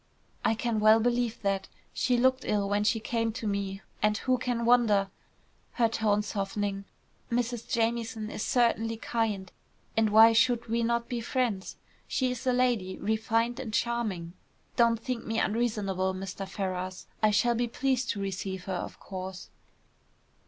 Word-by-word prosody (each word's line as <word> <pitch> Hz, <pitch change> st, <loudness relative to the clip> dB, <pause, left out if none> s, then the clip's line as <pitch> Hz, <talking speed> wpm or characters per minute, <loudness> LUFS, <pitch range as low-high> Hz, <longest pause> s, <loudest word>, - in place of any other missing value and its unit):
"I 225 Hz, -, +2 dB
can 230 Hz, -1 st, -1 dB
well 215 Hz, +1 st, +6 dB
believe 240 Hz, 0 st, 0 dB
that. 195 Hz, -1 st, 0 dB, 0.3 s
She 250 Hz, -1 st, +1 dB
looked 260 Hz, +1 st, +3 dB
ill 205 Hz, -1 st, 0 dB
when 205 Hz, +1 st, +1 dB
she 220 Hz, +2 st, +2 dB
came 230 Hz, 0 st, -1 dB
to 230 Hz, -, -6 dB
me. 200 Hz, -1 st, -2 dB, 0.2 s
And 210 Hz, 0 st, +3 dB
who 255 Hz, +1 st, +1 dB
can 240 Hz, -2 st, -1 dB
wonder?" 215 Hz, -5 st, +4 dB, 0.6 s
her 235 Hz, -2 st, +3 dB
tone 215 Hz, -2 st, +1 dB
softening. 200 Hz, -1 st, -3 dB, 0.5 s
"Mrs. 240 Hz, -1 st, -1 dB
Jamieson 230 Hz, -1 st, -1 dB
is -, -, -5 dB
certainly 225 Hz, -2 st, +1 dB
kind, 215 Hz, -5 st, -2 dB, 0.4 s
and 225 Hz, -1 st, +3 dB
why 220 Hz, +2 st, +8 dB
should 235 Hz, +1 st, +3 dB
we 230 Hz, +1 st, 0 dB
not 235 Hz, 0 st, 0 dB
be 240 Hz, -1 st, -3 dB
friends? 230 Hz, -5 st, -1 dB, 0.3 s
She 255 Hz, -2 st, 0 dB
is 250 Hz, +1 st, -5 dB
a -, -, +5 dB
lady, 245 Hz, -7 st, +1 dB
refined 225 Hz, +3 st, 0 dB
and 250 Hz, -5 st, -5 dB
charming. 210 Hz, -7 st, -1 dB, 0.4 s
Don't 235 Hz, -2 st, +4 dB
think 245 Hz, 0 st, -3 dB
me 225 Hz, 0 st, -1 dB
unreasonable, 205 Hz, -5 st, 0 dB
Mr. 195 Hz, +1 st, -6 dB
Ferrars. 185 Hz, -2 st, -4 dB, 0.2 s
I 215 Hz, -, +5 dB
shall 220 Hz, +3 st, +3 dB
be 240 Hz, +1 st, 0 dB
pleased 260 Hz, +1 st, 0 dB
to 205 Hz, -, -1 dB
receive 190 Hz, -1 st, -4 dB
her, 190 Hz, -, -3 dB
of 180 Hz, -, -5 dB
course." 185 Hz, -1 st, -7 dB
225 Hz, 160 wpm, -29 LUFS, 200-235 Hz, 0.6 s, why